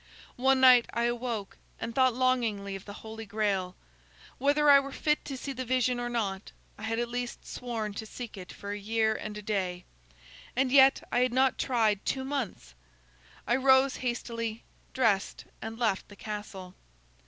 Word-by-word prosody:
"One 265 +1 +3
night 255 -2 +7
I 235 - 0
awoke, 235 -4 -2 0.2
and 230 +1 -4
thought 255 -1 +3
longingly 230 -6 0
of 195 - -9
the 205 - -8
Holy 220 0 -7
Grail. 200 -3 -1 0.6
Whether 290 +3 +3
I 280 -1 +9
were 275 0 -5
fit 300 +2 0
to 275 -2 -5
see 275 +2 -5
the 260 0 -4
vision 250 0 +1
or 240 0 -2
not, 205 -5 -3 0.2
I - - -14
had 225 +1 -2
at 240 0 0
least 245 0 -5
sworn 225 -4 -4
to 220 +2 -6
seek 240 0 -8
it 185 -2 -9
for 200 0 -7
a 205 - -4
year 220 +1 +1
and 215 -1 -6
a 210 - -8
day. 185 -4 -2 0.7
And 260 0 +1
yet, 270 0 +6
I 245 - +2
had 250 -1 +2
not 260 +1 +2
tried 220 -6 +1
two 265 - -1
months! 260 - -4 0.7
I 240 - +2
rose 265 0 +4
hastily, 230 -2 -3 0.3
dressed, 220 -7 0 0.2
and 225 0 -6
left 220 -5 0
the 205 - -13
castle. 205 -3 -7
235 Hz, 175 wpm, -29 LUFS, 210-255 Hz, 0.7 s, I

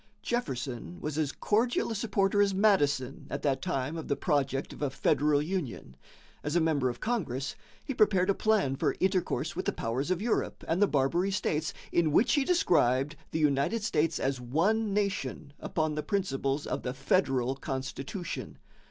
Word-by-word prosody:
Jefferson 135 - -3
was 150 -1 -4
as 150 -2 0
cordial 230 +3 +1
a - - -2
supporter 205 -1 +1
as 200 -1 +2
Madison 145 - +2
at 140 - -4
that 135 -2 +1
time 135 +4 -2
of 160 - -5
the 140 - +1
project 140 -4 0
of - - -12
a 145 - +1
federal 145 +2 +2
union. 155 - -4 0.5
As 150 +2 -2
a - - +5
member 155 -6 +2
of 120 - -6
Congress, 155 - -2 0.3
he 275 - -2
prepared 195 -6 +3
a 200 - +4
plan 200 -11 +2
for - - 0
intercourse 185 -1 0
with - - -3
the - - +2
powers 125 +7 -2
of 185 -2 +1
Europe 220 +2 -1
and 165 +4 +1
the 205 - +6
Barbary 150 +7 +1
States, 160 -5 -1 0.2
in 165 -3 +2
which 235 +10 +4
he 285 - +3
described 150 - +2
"the - - -2
United 150 +8 +1
States 165 -7 +1
as 135 -1 -1
one 195 - +1
nation 195 -8 -2
upon 155 -2 -1
the 150 - -2
principles 150 -8 -1
of - - -2
the 125 +1 -4
federal 135 -3 +1
constitution." 135 +6 -5
155 Hz, 175 wpm, -29 LUFS, 135-195 Hz, 0.5 s, the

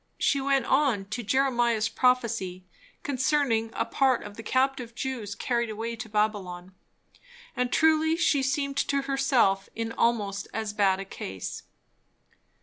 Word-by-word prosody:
She 280 - +1
went 270 -2 +1
on, 265 -9 +2
to 240 +3 -3
Jeremiah's 240 -2 +2
prophecy 225 -8 0 0.4
concerning 260 -4 +1
a - - -1
part 265 -2 +2
of 205 - -9
the 225 - -8
captive 255 0 0
Jews 235 -7 -4
carried 235 +1 -1
away 225 +2 -4
to 220 0 -7
Babylon. 195 -4 -2 0.8
And 250 0 -1
truly 320 0 +3
she 305 -4 +2
seemed 280 +1 -1
to 280 -1 +1
herself 265 -8 +2
in 230 0 -3
almost 205 -5 0
as 220 -2 -3
bad 195 -2 +2
a 195 - -5
case. 95 - -6
235 Hz, 140 wpm, -27 LUFS, 210-270 Hz, 0.8 s, truly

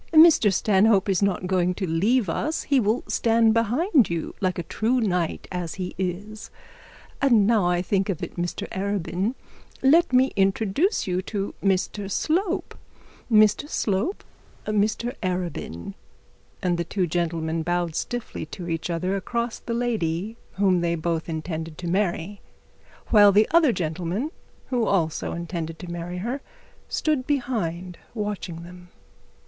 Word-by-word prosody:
'Mr 315 - +7
Stanhope 200 +1 +3
is 190 -1 +2
not 195 -2 +1
going 180 -1 +1
to 190 - -2
leave 200 +8 +2
us. 305 - -1
He 280 -2 +3
will 220 +2 +1
stand 225 -1 +3
behind 245 - +3
you 170 -1 -3
like 185 -2 0
a 175 - -2
true 235 +8 0
knight 180 -7 -1
as 180 -3 -4
he 185 -2 -4
is. 195 +4 -4 0.7
And 235 -7 +5
now 215 -4 +3
I 175 0 +1
think 195 +1 0
of 185 - -2
it, - - -6
Mr 175 0 -3
Arabin, 200 +3 -2 0.5
let 325 +5 +5
me 255 +1 +4
introduce 200 - +1
you 185 -1 -1
to 200 -2 -3
Mr 195 +1 0
Slope. 355 - -1 0.6
Mr 215 +6 +4
Slope, 215 - -1 0.4
Mr 215 +3 0
Arabin.' 175 - -3 0.7
And 175 -2 +1
the - - +1
two 185 +2 -1
gentlemen 165 -1 -1
bowed 175 0 -1
stiffly 240 -8 -4
to 175 +2 -7
each 165 0 -3
other 180 +3 -1
across 235 +4 -2
the 230 - -4
lady 220 -4 -1 0.2
they 180 -4 +2
both 165 0 -2
intended 160 0 -4
to 180 -1 -5
marry, 190 +1 -1 0.7
while 205 -2 +7
the 210 +2 +4
other 325 -4 +5
gentleman 180 - -2 0.4
who 240 -3 +1
also 165 -5 0
intended 170 -1 -4
to 175 0 -8
marry 175 +1 -5
her 240 +9 -3 0.5
stood 300 -5 0
behind, 185 - -2 0.2
watching 205 -6 -4
them. 180 0 -12
195 Hz, 140 wpm, -25 LUFS, 175-230 Hz, 0.7 s, Mr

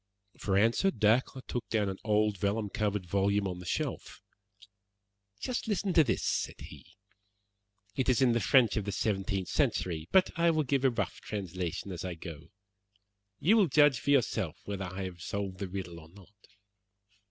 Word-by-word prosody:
For 95 -1 0
answer 115 - +3
Dacre 120 - +1
took 120 - -4
down 105 -2 +1
an 95 0 -4
old 105 -1 +2
vellum 105 +1 -1
covered 105 -3 -1
volume 100 +2 +1
from 90 -2 -4
the 90 - -9
shelf. - - -3 1.2
"Just 250 -2 -3
listen 200 -3 0
to 160 - +6
this," 130 - -1
said - - -1
he; - - -12 1.0
"it 130 - 0
is 125 - +3
in 130 -3 +4
the 115 - +2
French 120 -3 +4
of 105 - -1
the 100 - -2
seventeenth 95 -2 -1
century, 80 -3 0
but 190 -1 +4
I 170 0 +3
will 155 -2 +2
give 140 -1 0
a 135 - +5
rough 120 - -3
translation 95 -2 -4
as 90 -2 -5
I 90 -2 -4
go. 80 -2 -9 0.9
You 195 +9 +4
will 205 -4 +5
judge 145 -3 +4
for - - -4
yourself 140 -4 +1
whether 100 -2 -4
I 95 +2 -5
have 90 -2 -7
solved 95 0 -4
the 100 - -3
riddle 90 -3 -6
or 80 0 -15
not. 100 +3 -19
105 Hz, 175 wpm, -30 LUFS, 95-130 Hz, 1.2 s, to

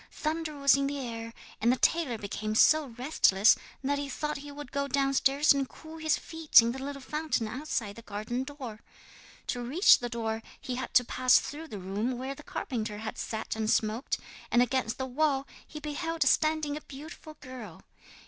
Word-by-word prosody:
Thunder 310 0 -3
was 280 0 +5
in 275 0 +1
the 285 +1 -3
air, 230 -3 -5 0.3
and 235 - +4
the - - +3
tailor 310 -5 +2
became 215 +1 -4
so 310 +5 +5
restless 230 -6 +4 0.3
that 285 +1 0
he 285 -1 -4
thought 300 +2 -3
he 285 +1 -9
would 290 -2 -9
go 280 0 -1
downstairs 275 +1 +3
and 275 -2 -1
cool 320 0 -11
his 315 -1 +1
feet 320 -2 +4
in 230 0 +3
the 265 +2 -6
little 275 0 -6
fountain 300 -6 -1
outside 230 -4 -3
the - - -8
garden 220 +4 -3
door. 265 -6 -8 0.7
To 245 - -2
reach 285 - +5
the 240 - -4
door 225 -1 -2 0.2
he 260 -3 -5
had 255 0 -5
to 250 - +6
pass 255 +1 +4
through 315 +3 -4
the 215 - -7
room 205 +7 -2
where 260 +2 -4
the 275 - -12
carpenter 220 -7 -4
had 220 +1 -6
sat 220 -1 -3
and 220 -1 -1
smoked, 220 +4 +1 0.3
and 240 +1 +5
against 250 -2 -1
the 265 - -2
wall 275 +1 +1 0.2
he 305 - -8
beheld 320 +2 -2
standing 310 +1 +2
a 305 - -6
beautiful 305 +3 -10
girl. 250 - -10
265 Hz, 190 wpm, -29 LUFS, 230-295 Hz, 0.7 s, to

